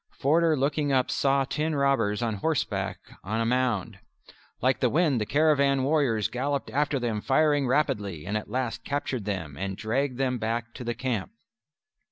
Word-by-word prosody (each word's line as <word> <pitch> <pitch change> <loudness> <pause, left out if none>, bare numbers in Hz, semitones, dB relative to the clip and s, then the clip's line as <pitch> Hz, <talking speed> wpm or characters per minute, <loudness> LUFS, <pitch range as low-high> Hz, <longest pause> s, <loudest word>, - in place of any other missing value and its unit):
Forder 160 +2 +3
looking 145 +2 0
up 130 -2 +2
saw 135 0 +2
ten 155 +3 -1
robbers 120 -6 +1
on 110 -3 -1
horseback 160 +9 -1 0.3
on 110 +4 -2
a 115 - +1
mound. 115 -5 0 0.6
Like 130 +2 +2
the 125 - +2
wind 150 -5 +2
the 105 - -2
caravan 140 -3 +3
warriors 135 -7 +2
galloped 140 +2 -2
after 145 0 +1
them 115 -4 -2
firing 145 +1 +2
rapidly, 100 - 0
and 100 +4 -3
at 105 - -3
last 120 -1 -2
captured 135 -6 -3
them 85 -8 -4
and 95 0 -3
dragged 125 +4 -1
them 130 -2 0
back 115 +1 -2
to 125 - -8
the 120 0 -2
camp. 130 - -3
130 Hz, 170 wpm, -27 LUFS, 110-140 Hz, 0.6 s, Forder